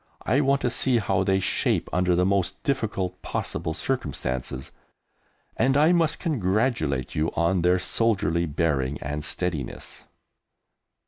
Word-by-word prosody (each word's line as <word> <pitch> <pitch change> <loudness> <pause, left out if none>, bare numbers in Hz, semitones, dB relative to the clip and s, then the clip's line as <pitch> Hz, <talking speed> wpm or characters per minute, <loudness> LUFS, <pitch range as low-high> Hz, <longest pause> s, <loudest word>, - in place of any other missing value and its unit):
I 130 +7 +2
want 140 -1 +2
to 125 - 0
see 125 0 +2
how 110 - +1
they 95 -1 +2
shape - - +1
under 90 -1 +2
the 90 +1 +2
most 95 0 0
difficult 105 -9 -2
possible 80 - -3
circumstances, 65 - -3 0.8
and 135 +1 +2
I 155 +3 +5
must 165 -3 +2
congratulate 95 - 0
you 75 +1 0
on 85 +2 +2
their 90 +2 +4
soldierly 95 -4 +1
bearing 75 -3 0
and 75 +2 -3
steadiness." 80 -4 -4
90 Hz, 130 wpm, -25 LUFS, 80-120 Hz, 0.8 s, I